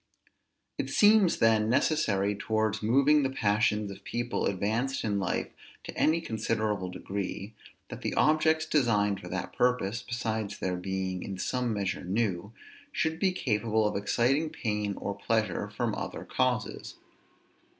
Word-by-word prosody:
It -, -, -2 dB
seems, 205 Hz, -4 st, +5 dB
then, 110 Hz, -1 st, +3 dB
necessary 115 Hz, -7 st, +2 dB
towards 110 Hz, +1 st, -1 dB
moving 140 Hz, +7 st, +4 dB
the 135 Hz, -, +1 dB
passions 105 Hz, -3 st, +1 dB
of 100 Hz, 0 st, -11 dB
people 120 Hz, +2 st, -2 dB
advanced 110 Hz, +8 st, -1 dB
in 105 Hz, -2 st, 0 dB
life 95 Hz, -, -1 dB, 0.3 s
to -, -, -8 dB
any 165 Hz, +2 st, +2 dB
considerable 110 Hz, -, -1 dB
degree, 100 Hz, +2 st, -5 dB, 0.4 s
that -, -, -8 dB
the -, -, -2 dB
objects 155 Hz, +1 st, +3 dB
designed 105 Hz, -10 st, +2 dB
for 90 Hz, -, -10 dB
that 90 Hz, +1 st, -4 dB
purpose, 120 Hz, -3 st, +1 dB
besides 110 Hz, -3 st, -3 dB
their 90 Hz, -1 st, -2 dB
being 95 Hz, 0 st, -3 dB
in 95 Hz, -, -5 dB
some 125 Hz, +5 st, -1 dB
measure 100 Hz, -3 st, -2 dB
new, 100 Hz, 0 st, -1 dB, 0.4 s
should 160 Hz, -, -1 dB
be 190 Hz, 0 st, +3 dB
capable 110 Hz, -, +1 dB
of -, -, -3 dB
exciting 125 Hz, +9 st, +1 dB
pain 105 Hz, -9 st, -2 dB
or 100 Hz, -, -3 dB
pleasure 110 Hz, +2 st, -1 dB
from -, -, -2 dB
other -, -, -5 dB
causes. -, -, -1 dB
110 Hz, 140 wpm, -29 LUFS, 100-125 Hz, 0.4 s, seems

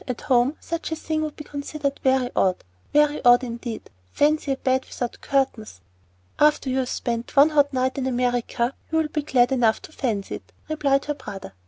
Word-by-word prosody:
"At 250 Hz, -2 st, -4 dB
home 255 Hz, +3 st, +2 dB
such 335 Hz, -1 st, -4 dB
a -, -, 0 dB
thing 315 Hz, 0 st, -2 dB
would 305 Hz, -1 st, -3 dB
be 300 Hz, -, -8 dB
considered 285 Hz, -1 st, -4 dB
very 260 Hz, -2 st, +2 dB
odd, 185 Hz, -1 st, +1 dB, 0.3 s
very 295 Hz, 0 st, +3 dB
odd 245 Hz, 0 st, +6 dB
indeed. 235 Hz, -1 st, -6 dB, 0.2 s
Fancy 295 Hz, -1 st, +2 dB
a -, -, -5 dB
bed 260 Hz, 0 st, +1 dB
without 245 Hz, -2 st, -5 dB
curtains!" 265 Hz, -, -1 dB, 0.6 s
"After 295 Hz, -3 st, +3 dB
you've 260 Hz, -1 st, 0 dB
spent 235 Hz, 0 st, -3 dB
one 285 Hz, +3 st, +7 dB
hot 285 Hz, -2 st, +3 dB
night 260 Hz, 0 st, 0 dB
in 260 Hz, -, -1 dB
America 245 Hz, 0 st, 0 dB, 0.2 s
you'll 320 Hz, -1 st, +1 dB
be 300 Hz, -, -2 dB
glad 250 Hz, -4 st, +2 dB
enough 235 Hz, -4 st, +3 dB
to -, -, -11 dB
fancy 225 Hz, -10 st, -2 dB
it," -, -, -22 dB, 0.2 s
replied 280 Hz, -3 st, +1 dB
her 295 Hz, -, -1 dB
brother. 210 Hz, -, -9 dB
265 Hz, 185 wpm, -24 LUFS, 245-295 Hz, 0.6 s, one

